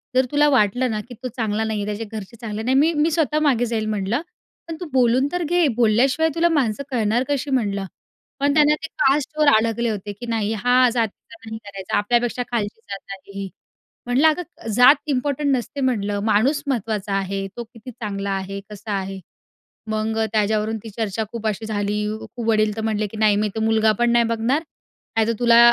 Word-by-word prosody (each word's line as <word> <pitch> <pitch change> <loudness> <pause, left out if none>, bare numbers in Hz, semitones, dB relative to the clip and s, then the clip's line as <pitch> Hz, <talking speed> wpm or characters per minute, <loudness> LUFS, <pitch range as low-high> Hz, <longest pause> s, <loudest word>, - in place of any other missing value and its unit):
जर 260 - +4
तुला 295 0 +4
वाटलं 245 0 +2
ना, 215 - -2
की - - -8
तो - - -1
चांगला 220 -2 -1
नाही 220 -1 -2
आहे, - - -3
त्याचे 225 - -5
घरचे 210 +2 -8
चांगले 220 -1 -4
नाही. 255 +3 +1
मी 315 +4 +4
मी 320 +2 +2
स्वतः 305 -1 +1
मागे 245 -2 +2
जाईल 225 -2 -2
म्हणलं. 215 +6 -1 0.5
पण 330 - -5
तू 360 - -5
बोलून 255 +1 +3
तर 355 -1 -1
घे. 345 0 +2
बोलल्याशिवाय 250 +7 +3
तुला 340 +1 +3
माणसं 280 -5 0
कळणार 235 0 +1
कशी 285 0 -1
म्हणलं. 200 -7 0 0.5
पण 285 +1 +2
त्यांना 300 0 +5
ते 320 - -3
कास्टवर 295 +2 +2
आडकले 230 +1 +1
होते, 205 -1 -4
की 205 +4 -9
नाही 225 -2 -1
हा 245 +4 +3
जातीचा 230 -1 -3
नाही 220 0 -6
करायचा. 195 -2 -3
आपल्यापेक्षा 240 +3 +1
खालची 220 -2 -2
जात 195 0 -7
आहे 195 0 -13
ही. 195 -1 -4 0.6
म्हणलं, 255 +6 +4
अगं 315 -6 -2
जात 250 +5 +8
इम्पोर्टंट 285 +1 0
नसते 275 +3 -4
म्हणलं 205 -6 0
माणूस 245 +7 +2
महत्त्वाचा 215 -5 -2
आहे. 195 0 -2
तो 240 - -3
किती 230 +1 -12
चांगला 200 -3 -4
आहे, 195 +1 -3
कसा 210 +1 -8
आहे. 195 0 -6 0.7
मग 220 +1 -1
त्याच्यावरून 215 +1 +1
ती 225 - -7
चर्चा 220 -1 -1
खूप 230 -2 -5
अशी 215 +1 -2
झाली 210 -1 -1 0.2
खूप. 240 -1 -8
वडील 215 -1 +2
तर 220 - -3
म्हणाले, 215 -1 0
की 210 - -10
"नाही 215 -1 +3
मी 215 - +1
तर 220 - -3
मुलगा 220 -1 +3
पण 240 0 +3
नाही 235 0 +4
बघणार. 230 +6 +1 0.6
नाहीतर 225 +1 +3
तुला 235 -1 +5
225 Hz, 195 wpm, -22 LUFS, 210-260 Hz, 0.7 s, जात